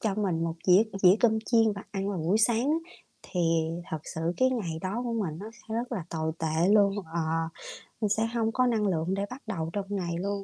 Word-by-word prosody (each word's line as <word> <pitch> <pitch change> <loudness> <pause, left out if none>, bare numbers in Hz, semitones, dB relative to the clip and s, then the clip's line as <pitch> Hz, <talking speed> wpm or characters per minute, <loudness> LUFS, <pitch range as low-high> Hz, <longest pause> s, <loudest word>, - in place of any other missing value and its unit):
cho 215 -4 0
mình 185 -6 0
một 165 -1 -2
dĩa 185 +3 +7 0.2
dĩa 185 0 +8
cơm 220 -2 +4
chiên 225 -2 +4
và 200 -1 -7
ăn 195 -1 -2
vào 200 -3 -2
buổi 170 +6 +1
sáng 235 +5 +3
á, 330 +3 -2 0.3
thì 180 - -3 0.5
thật 160 - -2 0.2
sự 160 - -4 0.2
cái 260 0 +3
ngày 185 -11 -2
đó 200 +6 -2
của 235 - -2
mình 185 -9 -2
nó 205 - -7
sẽ 220 0 -9
rất 240 +2 -2
là 195 -8 -3
tồi 160 -1 -2
tệ 160 +2 +1
luôn. 200 -2 +5 0.2
Ờ, 170 - +1 0.8
mình 210 - +1
sẽ 220 +2 +1
hông 225 -1 +1
có 255 +2 +2
năng 220 -3 +1
lượng 170 -1 0
để 200 +1 -1
bắt 255 +2 -8
đầu 160 -3 -3
trong 200 -1 -2
ngày 180 -4 -2
luôn, 200 +1 -2
200 Hz, 235 wpm, -28 LUFS, 175-225 Hz, 0.8 s, dĩa